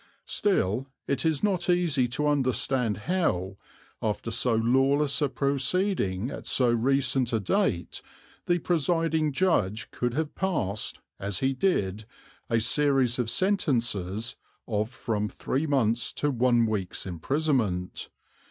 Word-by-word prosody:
Still 130 - 0 0.2
it 140 - -1
is 160 +1 0
not 185 -4 +1
easy 165 -8 +2
to 125 +5 -2
understand 130 -4 +1
how, 100 - 0 0.4
after 110 +1 -2
so 115 +1 +2
lawless 135 +6 +2
a 145 - +2
proceeding 140 - 0
at - - -8
so 125 -2 +3
recent 130 +1 +1
a 115 - +2
date, 100 - -1 0.5
the 175 - +3
presiding 165 -2 +1
judge 125 - 0
could 120 0 -2
have 155 0 -2
passed, 130 - -2 0.2
as 100 -1 -1
he 135 +4 +1
did, 110 - 0 0.4
a 115 -1 +2
series 130 +1 +2
of 120 -2 0
sentences 115 - 0 0.3
of 110 -1 -1
from 110 -5 -2
three 140 +9 -2
months' 120 -5 +1
to 145 - 0
one 120 -2 +3
week's 105 -5 -2
imprisonment. 100 - -1
130 Hz, 125 wpm, -27 LUFS, 110-150 Hz, 0.5 s, so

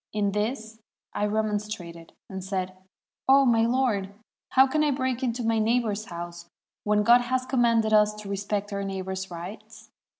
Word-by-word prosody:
In 205 -1 0
this 220 +1 -3 0.3
I 210 - 0
remonstrated, 210 -6 -3
and 190 -1 -7
said, 190 -1 -2 0.3
' - - -4
0 275 0 +7
my 230 -2 +4
lord, 235 -6 0 0.4
how 265 0 +7
can 305 +3 +1
I 300 - +2
break 260 -2 -1
into 245 -1 -1
my 225 0 +1
neighbor's 220 -2 0
house, 170 -1 -8 0.3
when 210 0 +2
God 240 +3 +6
has 255 +1 -1
commanded 230 -4 +2
us 210 0 +5
to 210 -1 -9
respect 200 +1 -3
our 200 0 -2
neighbors' 190 0 -4
rights?' 175 +5 -10
215 Hz, 165 wpm, -26 LUFS, 195-240 Hz, 0.4 s, 0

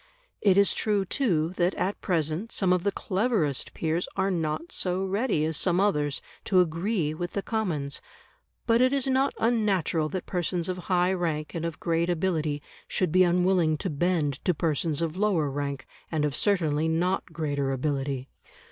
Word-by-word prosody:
It 195 -2 +4
is 200 0 +5
true, 205 -3 +1
too, 175 - +1
that 180 +1 +2
at 195 +3 -2
present 165 +4 -1
some 185 -2 +2
of 180 - +1
the 200 - +1
cleverest 190 - 0
peers 165 +2 -1
are 195 0 +1
not 170 - -2
so 185 - -1
ready 195 -4 0
as 160 -1 0
some 180 +2 +2
others 150 -9 +1 0.2
to 185 - +4
agree 170 -1 0
with 175 +2 -5
the 200 - -2
Commons. 165 -11 -2 0.6
But 230 0 +3
it 255 +1 +4
is 275 -2 +1
not 265 +1 +1
unnatural 195 -9 +1
that 185 +3 -4
persons 175 -1 -1
of 185 -1 -3
high 180 0 +3
rank 160 -4 -2
and 165 -1 -3
of 165 -1 -4
great 170 +1 0
ability 160 -4 0 0.2
should 185 -4 0
be 185 +2 +5
unwilling 180 -2 +3
to 185 - -3
bend 150 -3 0
to 180 - +1
persons 155 0 0
of 165 +1 -3
lower 185 -8 +1
rank, 140 -1 -3 0.3
and 155 -2 +1
of 145 -2 -2
certainly 160 -6 +2
not 175 +4 0
greater 145 -4 -1
ability. 135 -1 -2
175 Hz, 175 wpm, -27 LUFS, 155-190 Hz, 0.6 s, is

